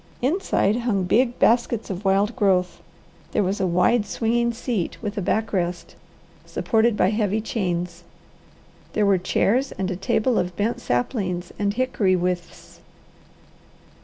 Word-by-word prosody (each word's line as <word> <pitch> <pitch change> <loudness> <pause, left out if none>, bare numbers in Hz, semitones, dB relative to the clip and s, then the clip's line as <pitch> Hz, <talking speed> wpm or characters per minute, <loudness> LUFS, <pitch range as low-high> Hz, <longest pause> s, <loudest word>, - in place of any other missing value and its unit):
Inside 260 - +1
hung 230 -6 0
big 240 +7 +2
baskets 230 -2 +2
of 190 +2 -5
wild 200 +3 +2
growth; 190 -6 +1 0.5
there - - +2
was 195 +2 -1
a 190 - +2
wide 180 +5 +2
swinging 235 +1 0
seat, 230 -5 -3
with 210 -2 -4
a 205 - -2
back 215 +5 -1
rest, 175 -2 -2 0.5
supported 225 -1 +1
by 185 - +3
heavy 210 -1 0
chains. 180 -5 -3 0.9
There 210 - +2
were 195 -2 +3
chairs 240 +8 +1
and 190 0 -3
a - - -2
table 220 +6 +1
of 180 0 -2
bent 215 +5 -1
saplings 175 - -2
and 205 0 0
hickory 220 -7 +1
withes. 180 -1 -4
205 Hz, 140 wpm, -23 LUFS, 180-230 Hz, 0.9 s, by